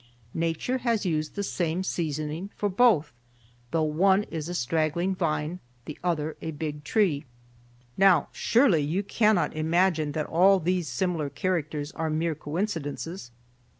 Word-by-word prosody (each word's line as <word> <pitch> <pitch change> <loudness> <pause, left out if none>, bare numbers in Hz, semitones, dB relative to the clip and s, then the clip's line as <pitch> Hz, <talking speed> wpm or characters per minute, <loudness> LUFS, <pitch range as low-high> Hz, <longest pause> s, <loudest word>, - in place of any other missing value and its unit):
Nature 165 +10 -1
has 230 -4 0
used 155 -3 -1
the 200 - -2
same 175 -2 -1
seasoning 155 +1 -3
for 205 - -1
both, 195 - +3 0.6
though 160 +5 +1
one 190 +6 +3
is 160 0 -4
a - - -3
straggling 160 +6 0
vine, 160 -1 -2 0.3
the 150 - -6
other 160 -3 -1
a 160 - -4
big 150 -1 -5
tree. 165 -4 +1 0.7
"Now, 195 -2 +5
surely 230 - +3
you 165 +8 -1
cannot 205 -7 +2
imagine 160 -1 +1
that 155 0 -1
all 190 +4 +4
these 180 0 0
similar 175 -6 -1
characters 150 -1 -2
are 160 -1 -3
mere 160 +1 0
coincidences. 165 - -4
165 Hz, 140 wpm, -27 LUFS, 155-190 Hz, 0.7 s, Now